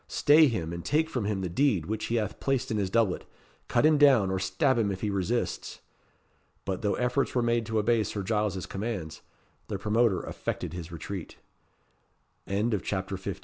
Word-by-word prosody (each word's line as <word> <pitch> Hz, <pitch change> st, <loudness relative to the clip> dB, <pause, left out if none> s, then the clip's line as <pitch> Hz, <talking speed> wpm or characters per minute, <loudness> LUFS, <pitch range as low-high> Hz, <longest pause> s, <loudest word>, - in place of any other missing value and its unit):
Stay 150 Hz, +2 st, +5 dB
him 85 Hz, -, -2 dB
and 85 Hz, 0 st, -6 dB
take 160 Hz, +2 st, +1 dB
from 120 Hz, -5 st, -2 dB
him 100 Hz, -2 st, -1 dB
the 95 Hz, -, -2 dB
deed 95 Hz, -, +1 dB
which 110 Hz, +3 st, -3 dB
he 115 Hz, -, -1 dB
hath 105 Hz, -3 st, -2 dB
placed 135 Hz, -4 st, -1 dB
in 110 Hz, -, 0 dB
his 100 Hz, -2 st, 0 dB
doublet. 105 Hz, -3 st, +1 dB, 0.4 s
Cut -, -, +2 dB
him 155 Hz, -1 st, +5 dB
down, 130 Hz, -10 st, +5 dB
or 95 Hz, -, 0 dB
stab 95 Hz, +8 st, +1 dB
him 105 Hz, -3 st, +1 dB
if 95 Hz, -, -5 dB
he 105 Hz, -, -1 dB
resists." 100 Hz, +5 st, -2 dB, 0.9 s
But, 95 Hz, -1 st, -3 dB
though 105 Hz, -2 st, +1 dB
efforts 125 Hz, +3 st, 0 dB
were 125 Hz, -, +2 dB
made 115 Hz, -1 st, +1 dB
to 110 Hz, -, -1 dB
obey 115 Hz, +2 st, +3 dB
Sir 100 Hz, -1 st, -4 dB
Giles's 105 Hz, -3 st, -1 dB
commands, 95 Hz, -7 st, -5 dB, 0.5 s
the -, -, -3 dB
promoter 110 Hz, -2 st, +1 dB
effected -, -, -4 dB
his 85 Hz, -1 st, -7 dB
retreat. 85 Hz, +2 st, -7 dB, 1.1 s
CHAPTER 100 Hz, -2 st, -1 dB
XVI. 95 Hz, -, -5 dB
105 Hz, 185 wpm, -28 LUFS, 95-120 Hz, 1.1 s, Stay